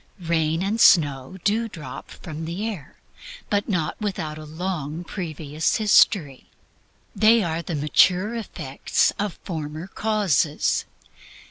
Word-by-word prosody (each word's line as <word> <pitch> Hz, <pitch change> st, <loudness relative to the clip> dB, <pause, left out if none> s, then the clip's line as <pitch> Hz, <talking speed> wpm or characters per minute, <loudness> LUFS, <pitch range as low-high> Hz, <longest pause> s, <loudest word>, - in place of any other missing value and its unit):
Rain 165 Hz, 0 st, +1 dB
and 215 Hz, +4 st, 0 dB
snow 145 Hz, 0 st, +4 dB
do 225 Hz, +3 st, +1 dB
drop 160 Hz, -7 st, -9 dB
from 160 Hz, -1 st, -8 dB
the 180 Hz, +7 st, -3 dB
air, 180 Hz, -11 st, -7 dB, 0.6 s
but 205 Hz, +1 st, 0 dB
not 180 Hz, 0 st, -1 dB
without 160 Hz, -7 st, -3 dB
a 155 Hz, -, -9 dB
long 160 Hz, -1 st, -4 dB
previous 160 Hz, -4 st, -2 dB
history. 195 Hz, -, +3 dB, 0.7 s
They 220 Hz, +1 st, +5 dB
are 165 Hz, -1 st, -2 dB
the 170 Hz, -1 st, -4 dB
mature 180 Hz, +8 st, +3 dB
effects 165 Hz, -, -1 dB
of 205 Hz, -3 st, -2 dB
former 155 Hz, -2 st, -5 dB
causes. 195 Hz, -, +1 dB
170 Hz, 120 wpm, -23 LUFS, 155-205 Hz, 0.7 s, They